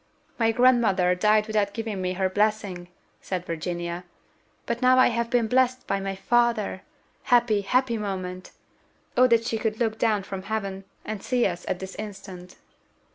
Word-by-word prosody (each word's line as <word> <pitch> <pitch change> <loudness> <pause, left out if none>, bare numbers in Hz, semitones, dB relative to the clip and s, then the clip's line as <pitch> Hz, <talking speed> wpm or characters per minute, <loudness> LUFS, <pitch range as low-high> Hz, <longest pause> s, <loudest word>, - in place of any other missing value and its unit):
"My 225 -1 +3
grandmother 225 -7 +3
died 210 +3 +3
without 210 -2 0
giving 220 -4 -4
me 185 0 -1
her 190 0 0
blessing," 200 -2 -1 0.3
said 180 -2 -4
Virginia; 170 +1 -4 0.6
"but 235 0 -3
now 255 0 +5
I 255 - +6
have 235 0 -1
been 240 -1 +2
blessed 255 +2 +1
by 195 - -1
my 195 0 -3
father! 230 -2 +1 0.4
Happy, 240 -5 +3
happy 235 +3 +1
moment! 185 -3 -5 0.7
O 255 +1 +6
that 230 -1 +3
she 225 -1 -1
could 220 -1 -2
look 225 -2 -1
down 215 -4 +1
from 190 0 -6
heaven, 195 -1 -4 0.2
and 215 -2 -5
see 250 -2 +1
us 175 -1 -2
at 185 - -1
this 190 +1 -7
instant!" 190 -4 -9
210 Hz, 165 wpm, -25 LUFS, 190-235 Hz, 0.7 s, I